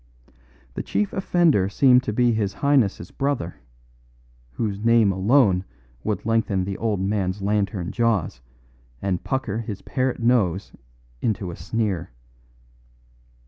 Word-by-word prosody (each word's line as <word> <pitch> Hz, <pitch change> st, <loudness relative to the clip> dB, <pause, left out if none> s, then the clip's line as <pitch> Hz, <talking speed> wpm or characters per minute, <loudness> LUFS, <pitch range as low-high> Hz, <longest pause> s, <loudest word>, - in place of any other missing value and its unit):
The -, -, -3 dB
chief 210 Hz, -2 st, -1 dB
offender 170 Hz, -, +2 dB
seemed 125 Hz, +3 st, +5 dB
to -, -, -1 dB
be 120 Hz, +2 st, +3 dB
his 105 Hz, -3 st, -1 dB
highness's 130 Hz, -9 st, +1 dB
brother, 135 Hz, -11 st, -2 dB, 1.0 s
whose 100 Hz, -, -3 dB
name 115 Hz, -3 st, +4 dB
alone 95 Hz, -1 st, +3 dB, 0.4 s
would 105 Hz, -2 st, -2 dB
lengthen 110 Hz, -4 st, +1 dB
the 95 Hz, +1 st, -4 dB
old 105 Hz, -2 st, -1 dB
man's 95 Hz, 0 st, -1 dB
lantern 100 Hz, -3 st, -1 dB
jaws 110 Hz, -, 0 dB, 0.6 s
and 95 Hz, 0 st, -2 dB
pucker 120 Hz, -6 st, -2 dB
his 105 Hz, -3 st, -6 dB
parrot 130 Hz, -1 st, -1 dB
nose 105 Hz, -6 st, +1 dB, 0.5 s
into 100 Hz, -5 st, -1 dB
a -, -, -8 dB
sneer. 105 Hz, -7 st, -2 dB
105 Hz, 120 wpm, -23 LUFS, 95-120 Hz, 1.0 s, seemed